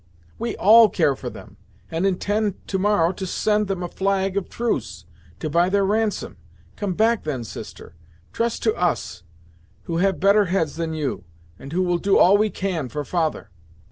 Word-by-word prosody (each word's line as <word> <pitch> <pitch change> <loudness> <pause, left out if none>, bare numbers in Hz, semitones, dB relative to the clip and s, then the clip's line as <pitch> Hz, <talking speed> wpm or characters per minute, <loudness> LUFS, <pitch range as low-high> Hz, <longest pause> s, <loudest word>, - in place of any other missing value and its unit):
"We 235 - -3
all 220 +2 +7
care 140 -6 +1
for - - -6
them, - - -13 0.3
and 165 +4 0
intend 205 +2 -1
to 190 - -1
morrow 190 -4 +2
to 190 0 -5
send 210 +2 +1
them 190 -2 -3
a - - -2
flag 195 +1 -1
of 200 - -2
truce, 235 0 -3 0.3
to 155 - -3
buy 170 +4 +2
their 200 0 +2
ransom. 215 +1 -1 0.4
Come 200 -4 -3
back 225 +2 +2
then, 135 -6 -3
sister; 105 - -10 0.4
trust 230 0 -2
to 220 - +2
us, 175 - -2 0.6
who 165 - -3
have 190 +1 +1
better 200 +2 +4
heads 170 -5 -1
than 165 -1 -3
you, 150 -4 -3 0.3
and 135 - -10
who 185 +3 +1
will 175 -1 0
do 200 +1 +3
all 190 +3 +6
we 215 +1 +2
can 180 -10 -3
for 150 +2 -4
father." 160 - -2
190 Hz, 180 wpm, -22 LUFS, 170-205 Hz, 0.6 s, all